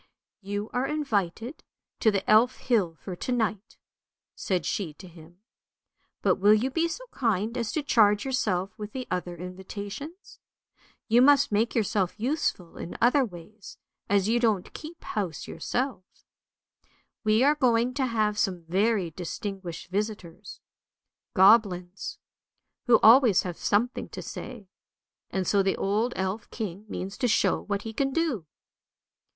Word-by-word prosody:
" -, -, -66 dB
You 205 Hz, +1 st, -3 dB
are 250 Hz, +2 st, 0 dB
invited 240 Hz, -, -2 dB, 0.4 s
to 220 Hz, -, +4 dB
the 200 Hz, -2 st, -1 dB
Elf 230 Hz, +4 st, +5 dB
hill 200 Hz, -10 st, 0 dB
for 180 Hz, +3 st, -7 dB
to 255 Hz, -, -4 dB
night," 220 Hz, -3 st, -2 dB, 0.6 s
said 180 Hz, -4 st, -2 dB
she 165 Hz, -7 st, -2 dB
to 185 Hz, -, -12 dB
him. 170 Hz, +1 st, -16 dB, 0.4 s
" -, -, -48 dB
But -, -, +3 dB
will 205 Hz, +2 st, +6 dB
you 250 Hz, +5 st, 0 dB
be 330 Hz, +4 st, +1 dB
so -, -, -6 dB
kind 225 Hz, -2 st, 0 dB
as 230 Hz, -4 st, -2 dB
to 310 Hz, -, -1 dB
charge 210 Hz, -6 st, +4 dB
yourself 200 Hz, -8 st, 0 dB
with 210 Hz, 0 st, -7 dB
the 255 Hz, -1 st, -5 dB
other 180 Hz, -1 st, -3 dB
invitations. 200 Hz, -, -8 dB, 0.7 s
You 235 Hz, +2 st, +5 dB
must 285 Hz, -1 st, +5 dB
make 220 Hz, +3 st, +1 dB
yourself 205 Hz, -3 st, 0 dB
useful 230 Hz, -, -2 dB
in -, -, -7 dB
other 255 Hz, +4 st, +4 dB
ways, 200 Hz, 0 st, -10 dB, 0.3 s
as 200 Hz, -1 st, +3 dB
you 235 Hz, +2 st, +2 dB
don't 220 Hz, -6 st, 0 dB
keep 330 Hz, +2 st, -10 dB
house 190 Hz, -7 st, -4 dB
yourself. 240 Hz, +5 st, -3 dB, 1.2 s
We 215 Hz, +2 st, +3 dB
are 290 Hz, +2 st, +5 dB
going 250 Hz, -4 st, +2 dB
to 265 Hz, -1 st, 0 dB
have 215 Hz, -3 st, 0 dB
some 180 Hz, -4 st, -1 dB
very 190 Hz, +1 st, +1 dB
distinguished 185 Hz, +1 st, -6 dB
visitors, 200 Hz, -4 st, -4 dB, 0.7 s
goblins, 190 Hz, -2 st, +3 dB, 0.7 s
who 235 Hz, -2 st, +7 dB
always 230 Hz, -3 st, +7 dB
have 180 Hz, -2 st, -4 dB
something 235 Hz, +5 st, 0 dB
to -, -, -7 dB
say, 235 Hz, -6 st, -8 dB, 0.6 s
and 190 Hz, -1 st, -2 dB
so 200 Hz, -, +3 dB
the 195 Hz, 0 st, 0 dB
old 215 Hz, +5 st, 0 dB
elf 190 Hz, +3 st, -3 dB
king 205 Hz, -2 st, -6 dB
means 195 Hz, 0 st, -5 dB
to 250 Hz, -, +2 dB
show 210 Hz, -, +2 dB
what 200 Hz, -1 st, -3 dB
he 225 Hz, -, -6 dB
can 270 Hz, +4 st, 0 dB
do." 265 Hz, -, -1 dB
210 Hz, 150 wpm, -27 LUFS, 190-245 Hz, 1.2 s, who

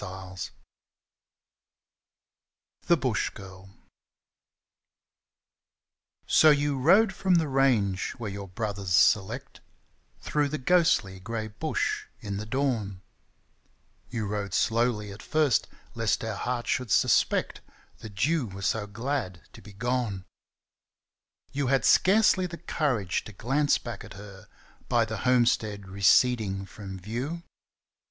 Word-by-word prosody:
I 95 Hz, -1 st, -8 dB, 2.5 s
THE 170 Hz, -, +5 dB
BUSH 130 Hz, -7 st, 0 dB
GIRL 95 Hz, -1 st, -12 dB, 2.6 s
So 155 Hz, -, +6 dB
you 145 Hz, -2 st, +2 dB
rode 195 Hz, -, +5 dB
from 185 Hz, -2 st, +1 dB
the 165 Hz, -2 st, +2 dB
range 120 Hz, -9 st, +1 dB
where 110 Hz, -4 st, -6 dB
your 100 Hz, 0 st, -7 dB
brothers 100 Hz, -1 st, -2 dB
select, 110 Hz, +8 st, +2 dB, 0.6 s
Through 150 Hz, -1 st, 0 dB
the 155 Hz, -, -3 dB
ghostly, 130 Hz, -, +2 dB
grey 110 Hz, +2 st, -5 dB
Bush 105 Hz, 0 st, -2 dB
in 100 Hz, -1 st, -5 dB
the 105 Hz, +1 st, -6 dB
dawn 110 Hz, -8 st, -2 dB, 0.5 s
— -, -, -39 dB
You 115 Hz, -3 st, -3 dB
rode 100 Hz, -2 st, -3 dB
slowly 115 Hz, -3 st, +1 dB
at 100 Hz, +2 st, -10 dB
first, 155 Hz, -6 st, +1 dB, 0.3 s
lest 115 Hz, -1 st, 0 dB
her 110 Hz, -1 st, -3 dB
heart 120 Hz, +3 st, -3 dB
should 125 Hz, -3 st, -1 dB
suspect -, -, +2 dB, 0.4 s
That 105 Hz, +1 st, -2 dB
you 155 Hz, -5 st, 0 dB
were 100 Hz, 0 st, -9 dB
so 105 Hz, +1 st, 0 dB
glad 105 Hz, -, -4 dB
to -, -, -13 dB
be 105 Hz, -, -13 dB
gone; 115 Hz, -3 st, -2 dB, 1.3 s
You 140 Hz, -1 st, -1 dB
had 135 Hz, +1 st, +2 dB
scarcely 190 Hz, -1 st, +4 dB
the 170 Hz, -1 st, -8 dB
courage 130 Hz, -, -1 dB
to 105 Hz, -, -10 dB
glance 135 Hz, +8 st, +1 dB
back 115 Hz, -4 st, -8 dB
at 110 Hz, -, -11 dB
her 100 Hz, -1 st, -12 dB, 0.4 s
By 120 Hz, -2 st, +3 dB
the 110 Hz, -1 st, -5 dB
homestead 110 Hz, -4 st, +1 dB
receding 95 Hz, +1 st, +2 dB
from 95 Hz, -1 st, -9 dB
view. 125 Hz, -, -5 dB
110 Hz, 120 wpm, -27 LUFS, 100-135 Hz, 2.6 s, So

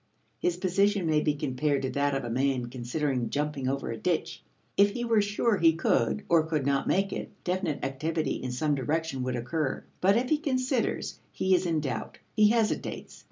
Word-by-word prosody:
His 175 Hz, -1 st, 0 dB
position 195 Hz, +1 st, +2 dB
may 155 Hz, -1 st, +3 dB
be 150 Hz, -1 st, +1 dB
compared 140 Hz, 0 st, 0 dB
to 130 Hz, -, -1 dB
that 140 Hz, 0 st, +1 dB
of 135 Hz, -, -2 dB
a 120 Hz, -, -4 dB
man 130 Hz, -1 st, 0 dB
considering 125 Hz, 0 st, -2 dB
jumping 145 Hz, -2 st, -2 dB
across 135 Hz, -3 st, -2 dB
a -, -, -6 dB
ditch. 165 Hz, +2 st, -1 dB, 0.3 s
If 200 Hz, 0 st, +4 dB
he 240 Hz, 0 st, -2 dB
were 225 Hz, -2 st, +4 dB
sure 205 Hz, +2 st, +1 dB
he 165 Hz, -2 st, +5 dB
could 170 Hz, +5 st, +1 dB
or 170 Hz, -1 st, +5 dB
could 155 Hz, -4 st, -1 dB
not 140 Hz, -1 st, +1 dB
make 195 Hz, +1 st, +1 dB
it, -, -, -4 dB
definite 180 Hz, -6 st, -1 dB
activity 155 Hz, +3 st, -2 dB
in 130 Hz, -, -3 dB
some 145 Hz, +4 st, 0 dB
direction 145 Hz, +1 st, -1 dB
would 125 Hz, 0 st, -1 dB
occur. 135 Hz, +4 st, -2 dB, 0.2 s
But 195 Hz, +4 st, +4 dB
if 250 Hz, +2 st, 0 dB
he 305 Hz, -, +3 dB
considers, 260 Hz, -4 st, -1 dB
he 190 Hz, -, +1 dB
is 185 Hz, 0 st, +3 dB
in 160 Hz, -2 st, +1 dB
doubt; 130 Hz, -6 st, -4 dB, 0.2 s
he 210 Hz, -1 st, +6 dB
hesitates. 225 Hz, -1 st, -1 dB
155 Hz, 195 wpm, -28 LUFS, 135-195 Hz, 0.3 s, he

